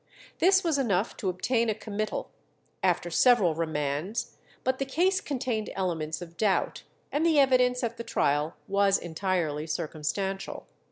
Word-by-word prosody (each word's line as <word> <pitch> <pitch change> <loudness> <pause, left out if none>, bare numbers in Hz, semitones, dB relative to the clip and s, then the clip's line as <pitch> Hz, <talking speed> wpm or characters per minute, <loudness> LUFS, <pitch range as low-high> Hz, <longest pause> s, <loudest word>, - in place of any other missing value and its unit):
This 380 +2 +5
was 320 -5 +1
enough 210 -5 0
to 195 - -1
obtain 230 +6 0
a 215 - 0
committal, 215 0 -4 0.5
after - - +1
several 240 -10 +5
remands; 155 +5 -2 0.3
but 260 0 0
the 275 - 0
case 360 +8 +1
contained 245 -6 -2
elements 165 -3 -2
of 170 -1 -13
doubt, 205 -3 +1 0.3
and 295 - 0
the 325 -3 +4
evidence 250 -2 +4
at 235 -1 -2
the 235 - -5
trial 150 -8 0
was 200 0 +3
entirely 165 -3 -2
circumstantial. 165 +5 -3
200 Hz, 145 wpm, -28 LUFS, 165-250 Hz, 0.5 s, This